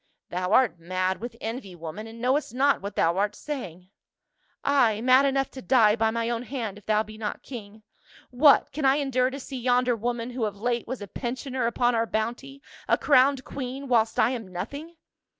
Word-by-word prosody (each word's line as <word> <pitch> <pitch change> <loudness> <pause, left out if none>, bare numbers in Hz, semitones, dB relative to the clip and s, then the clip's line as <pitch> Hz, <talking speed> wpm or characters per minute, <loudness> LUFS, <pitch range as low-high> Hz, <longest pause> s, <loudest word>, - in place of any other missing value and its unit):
" - - -60
Thou 180 +1 -2
art 235 -7 +3
mad 185 +3 -2
with 235 0 -6
envy, 225 -5 -6
woman, 170 +6 -7
and 225 +1 -11
knowest 255 0 0
not 280 +2 +3
what 200 +1 -6
thou 170 +2 +2
art 205 +1 0
saying." 185 - -7 0.4
" - - -44
Ay, 245 -7 +3
mad 255 +4 +5
enough 270 -1 0
to 260 - -9
die 225 -5 +4
by 225 -1 +2
my 230 +1 -1
own 235 -1 -1
hand 235 -6 -5
if 205 - -27
thou 215 0 +3
be 215 0 -12
not 210 -2 -4
king. 215 -4 -10 0.5
What, 280 +3 +5
can 300 +2 -4
I 270 0 +5
endure 260 -3 +1
to 275 +2 -7
see 265 -1 -7
yonder 245 0 +2
woman, 240 +2 -3
who 245 -2 -2
of 205 -1 -5
late 240 +1 -1
was 245 -3 -5
a - - -8
pensioner 255 +3 -3
upon 240 +1 +1
our 230 0 +1
bounty, 245 +6 -4 0.2
a - - +3
crowned 270 -1 +4
queen, 270 +1 -6
whilst 230 -3 +2
I 220 - +4
am 235 -6 -5
nothing?" 280 - -6
240 Hz, 205 wpm, -26 LUFS, 215-260 Hz, 0.5 s, mad